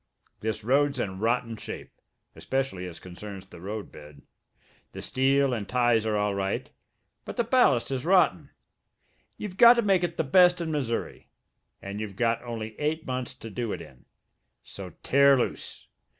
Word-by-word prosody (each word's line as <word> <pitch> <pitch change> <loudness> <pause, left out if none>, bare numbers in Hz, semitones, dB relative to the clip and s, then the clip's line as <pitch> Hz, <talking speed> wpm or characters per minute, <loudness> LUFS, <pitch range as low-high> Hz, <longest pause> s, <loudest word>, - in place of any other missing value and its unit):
This 110 -1 -3
road's 140 +3 +2
in 95 -4 -3
rotten 115 +1 0
shape, - - -8 0.4
especially 130 -9 -2
as 85 - -9
concerns 95 +2 -9
the 85 - -14
roadbed. 75 -8 -8 0.7
The - - -7
steel 135 0 +2
and 110 -4 -4
ties 120 -3 +2
are 105 -1 +1
all 105 0 0
right, 100 0 -2 0.5
but - - -8
the 235 - +2
ballast 225 - +3
is 130 -1 -2
rotten. 185 +1 +3 0.9
You've 190 -3 -7
got 235 +2 +9
to 235 - +1
make 195 -3 +3
it 170 -1 -2
the - - +1
best 180 +4 +5
in 165 -2 -3
Missouri, 130 -6 -3 0.6
and 100 +1 -5
you've 105 -3 -5
got 115 +2 +1
only 110 -3 -6
eight 155 +2 -1
months 130 -1 -4
to 115 - -10
do 115 0 -3
it - - -5
in. 65 -2 -14 0.6
So 95 -2 -9
tear 140 0 +5
loose. 125 - -4
120 Hz, 165 wpm, -27 LUFS, 105-145 Hz, 0.9 s, got